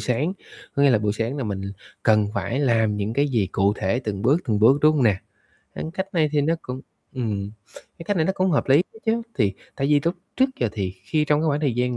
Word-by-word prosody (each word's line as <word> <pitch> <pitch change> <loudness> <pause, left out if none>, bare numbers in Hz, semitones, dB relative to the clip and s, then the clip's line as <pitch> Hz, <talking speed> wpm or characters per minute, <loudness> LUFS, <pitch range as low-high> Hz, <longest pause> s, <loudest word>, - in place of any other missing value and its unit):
sáng. 140 +9 0 0.4
Có 140 - +2
nghĩa 140 - +6
là 110 - +4
buổi 105 -1 0
sáng 115 +5 -2
là 135 - -3
mình 100 -2 -3 0.4
cần 105 -2 +3
phải 100 +7 -1
làm 110 -6 +2
những 105 +2 -2
cái 140 +3 +1
gì 115 -7 +1
cụ 100 +1 +2
thể 115 +7 0
từng 105 -4 -4
bước, 145 +8 +3
từng 105 -3 0
bước, 130 +7 +5
đúng 155 0 +5
hông 135 -5 +2
nè? 105 -4 +4 0.6
À, - - -5
cách 190 0 -2
này 155 -3 +3
thì 145 - +3
nó 160 +4 +2
cũng 130 +1 -6 0.3
ừm, 105 -6 -2 0.5
cái 165 - -8
cách 205 - -1
này 160 -2 +2
nó 190 - +1
cũng 185 -1 +1
hợp 145 - +1
lý 135 - +6
ấy 175 - +3 0.2
chứ. 230 +1 +1 0.2
Thì 105 -5 +2 0.2
tại 135 - 0
vì 145 -1 +4
lúc 170 - +1 0.2
trước 265 - +4
giờ 120 - +2
thì 95 -4 -2
khi 150 +7 +1
trong 150 0 +2
cái 160 - 0
khoảng 145 0 0
thời 140 -6 0
gian 125 0 0
130 Hz, 260 wpm, -23 LUFS, 105-150 Hz, 0.6 s, nghĩa